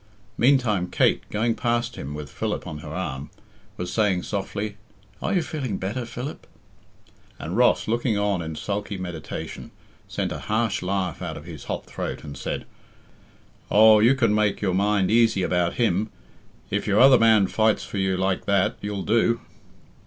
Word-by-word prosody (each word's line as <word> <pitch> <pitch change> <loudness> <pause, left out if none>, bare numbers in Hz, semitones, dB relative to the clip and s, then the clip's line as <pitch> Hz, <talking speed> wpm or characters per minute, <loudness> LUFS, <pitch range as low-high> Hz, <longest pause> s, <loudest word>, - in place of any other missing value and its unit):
Meantime 115 -8 +3
Kate, - - +2
going 115 +2 +1
past 120 0 -1
him 70 +2 -6
with 75 -1 -6
Philip - - -3
on 75 - -6
her 75 - -9
arm, 75 -5 -4 0.5
was 90 0 -4
saying 100 -5 +2
softly, 105 +1 -4 0.4
"Are - - -1
you 175 - +2
feeling 135 -11 -3
better, 115 +6 -3
Philip?" 125 +5 -7 0.9
And - - -5
Ross, - - +3
looking 115 -1 +1
on 100 -3 0
in 80 -1 -5
sulky 100 +2 -3
meditation, 90 -4 -6 0.4
sent - - -2
a - - -4
harsh 110 -1 0
laugh 95 -2 -2
out - - -4
of 75 - -10
his 80 -5 -9
hot - - -4
throat, - - -5
and 70 - -8
said, - - -4 1.0
"Oh, 110 +1 +7
you 120 +5 +5
can 115 -5 +2
make 105 -1 +1
your 95 -3 0
mind 100 0 +2
easy 115 -4 +4
about 90 -1 +1
him, 110 -2 +1 0.6
if - - -1
your 100 0 +3
other 130 0 +8
man 110 -3 +5
fights 110 +3 +1
for 100 - -5
you 95 -1 +1
like 95 0 0
that 100 -2 +2
you'll 100 -1 -3
do. 115 +1 +2
105 Hz, 165 wpm, -24 LUFS, 90-115 Hz, 1.0 s, other